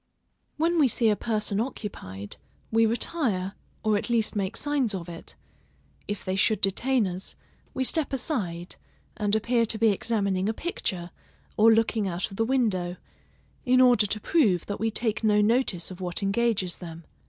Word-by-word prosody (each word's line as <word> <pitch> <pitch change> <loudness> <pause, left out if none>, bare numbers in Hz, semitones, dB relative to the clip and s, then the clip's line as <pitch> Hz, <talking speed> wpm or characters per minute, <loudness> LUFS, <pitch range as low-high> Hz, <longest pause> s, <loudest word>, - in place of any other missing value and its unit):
When 335 +2 +2
we 290 - +6
see 230 -1 +2
a 210 - +3
person 210 -2 -1
occupied, 100 - -5 0.3
we 225 0 +4
retire, 220 - 0 0.3
or 215 -2 +3
at - - -7
least 230 -2 +1
make 195 -2 -2
signs 280 -8 0
of 175 -2 -6
it; 170 -1 -7 0.7
if 205 -2 -4
they 185 - -1
should 215 +3 +2
detain 235 +5 +2
us, 185 0 -5 0.4
we 260 - 0
step 305 +3 +1
aside, 200 - -2 0.4
and 210 -1 +1
appear 230 +2 +2
to 220 - 0
be 225 +1 +4
examining 200 -2 0
a 220 - -2
picture, 180 - -3 0.4
or 225 +2 +6
looking 220 -2 +2
out 180 +3 -3
of 195 - -9
the 225 - +2
window, 210 -9 +1 0.7
in 255 -1 +4
order 245 -5 +5
to 215 - -2
prove 210 - +2
that 205 - -4
we 225 - +1
take 220 0 -2
no 210 -1 +4
notice 210 -5 +1
of 185 0 -9
what 180 +2 -3
engages 195 -3 +1
them. 170 -2 -9
215 Hz, 170 wpm, -26 LUFS, 190-235 Hz, 0.7 s, we